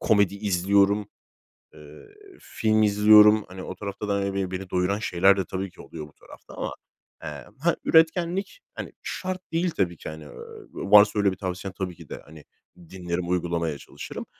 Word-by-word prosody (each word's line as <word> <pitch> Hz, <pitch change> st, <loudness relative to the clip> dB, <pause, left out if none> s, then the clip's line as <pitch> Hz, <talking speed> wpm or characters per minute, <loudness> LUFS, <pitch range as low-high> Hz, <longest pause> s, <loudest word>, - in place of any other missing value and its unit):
komedi 100 Hz, -3 st, +3 dB
izliyorum, 100 Hz, +1 st, +2 dB, 0.7 s
eee, 75 Hz, 0 st, -14 dB, 0.3 s
film 110 Hz, -1 st, 0 dB
izliyorum. 105 Hz, 0 st, +6 dB
Hani, 95 Hz, 0 st, -9 dB
o 95 Hz, -, -7 dB
tarafta 100 Hz, +1 st, -6 dB
da, 100 Hz, -, 0 dB
hani, 100 Hz, 0 st, -1 dB
be 95 Hz, -1 st, -2 dB
beni 95 Hz, 0 st, -5 dB
doyuran 90 Hz, +3 st, 0 dB
şeyler 95 Hz, -2 st, +3 dB
de 95 Hz, -, -1 dB
tabii 95 Hz, 0 st, -5 dB
ki -, -, -14 dB
oluyor 75 Hz, -2 st, -9 dB
bu 75 Hz, -, -20 dB
tarafta -, -, -16 dB
ama, -, -, -4 dB, 0.5 s
eee, 80 Hz, -, -4 dB, 0.3 s
he, 170 Hz, 0 st, +3 dB
üretkenlik, 170 Hz, -, +2 dB
hani, -, -, -7 dB
şart 185 Hz, 0 st, -4 dB
değil 170 Hz, +2 st, +1 dB
tabii 90 Hz, -, -1 dB
ki, -, -, -8 dB
hani. 80 Hz, 0 st, -9 dB
Eee, 75 Hz, -, -12 dB, 0.4 s
varsa 105 Hz, +2 st, +5 dB
öyle 100 Hz, -1 st, +3 dB
bir 95 Hz, -, -7 dB
tavsiyen 95 Hz, 0 st, -5 dB
tabii 90 Hz, -3 st, -4 dB
ki -, -, -15 dB
de, -, -, -7 dB
hani, 75 Hz, 0 st, -14 dB, 0.5 s
dinlerim, 90 Hz, -1 st, -4 dB
uygulamaya 85 Hz, -3 st, -1 dB
çalışırım -, -, -9 dB
100 Hz, 175 wpm, -25 LUFS, 90-105 Hz, 0.7 s, izliyorum